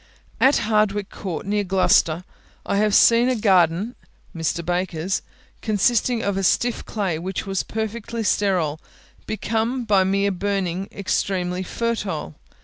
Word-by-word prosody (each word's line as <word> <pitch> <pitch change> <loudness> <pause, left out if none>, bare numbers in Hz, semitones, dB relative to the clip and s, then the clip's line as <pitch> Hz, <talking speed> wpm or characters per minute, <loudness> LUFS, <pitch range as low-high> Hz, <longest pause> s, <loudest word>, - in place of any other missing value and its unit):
At 270 +2 +4
Hardwicke 210 -2 +1
Court, 185 -5 -5
near 205 +1 0
Gloucester, 180 -3 +2 0.4
I 200 - 0
have 210 0 +2
seen 235 +2 +6
a 255 - +1
garden 190 0 +2 0.4
(Mr. 165 +1 -2
Baker's) 175 0 -1 0.4
consisting 225 +2 +1
of 200 -1 -1
a 195 - -1
stiff 240 +5 +1
clay, 190 -7 -2
which 185 +3 -4
was 195 -1 -1
perfectly 225 +1 -4
sterile, 180 -8 +1 0.5
become 225 +4 -1
by 200 -3 +4
mere 200 +1 +1
burning 190 -1 -2
extremely 185 -2 -1
fertile. 190 - -3
200 Hz, 130 wpm, -22 LUFS, 180-220 Hz, 0.5 s, seen